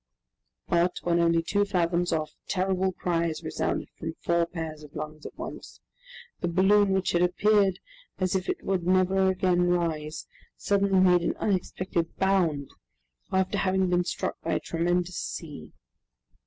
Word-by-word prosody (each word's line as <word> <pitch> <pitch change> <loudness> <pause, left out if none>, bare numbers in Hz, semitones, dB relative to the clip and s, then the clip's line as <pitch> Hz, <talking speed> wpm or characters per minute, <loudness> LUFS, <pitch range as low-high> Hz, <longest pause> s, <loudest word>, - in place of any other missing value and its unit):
But, 175 +1 +2
when 170 0 +2
only 170 -1 +3
two 205 +4 +1
fathoms 175 -3 0
off, 155 -1 -1 0.2
terrible 190 0 0
cries 170 -3 -1
resounded - - -2
from 160 0 -5
four 170 0 +1
pairs 160 -3 -6
of 150 -1 -14
lungs 155 0 -6
at - - -13
once. - - -8 0.6
The 175 - -1
balloon, 195 +4 +4
which 190 -1 +1
had 175 - +2
appeared 195 +2 +3 0.4
as 185 -1 0
if 185 -1 -1
it - - -2
would 190 -3 -1
never 185 +1 +3
again 180 -1 +2
rise, 160 -3 -1 0.3
suddenly 200 -1 +2
made 180 -1 +5
an - - -1
unexpected 185 -3 -2
bound, 175 -8 +1 0.6
after 190 +1 +1
having 190 -1 +1
been 175 0 +3
struck - - -3
by - - -2
a - - +1
tremendous 175 +2 -1
sea. 150 -5 -6
180 Hz, 150 wpm, -27 LUFS, 170-190 Hz, 0.6 s, made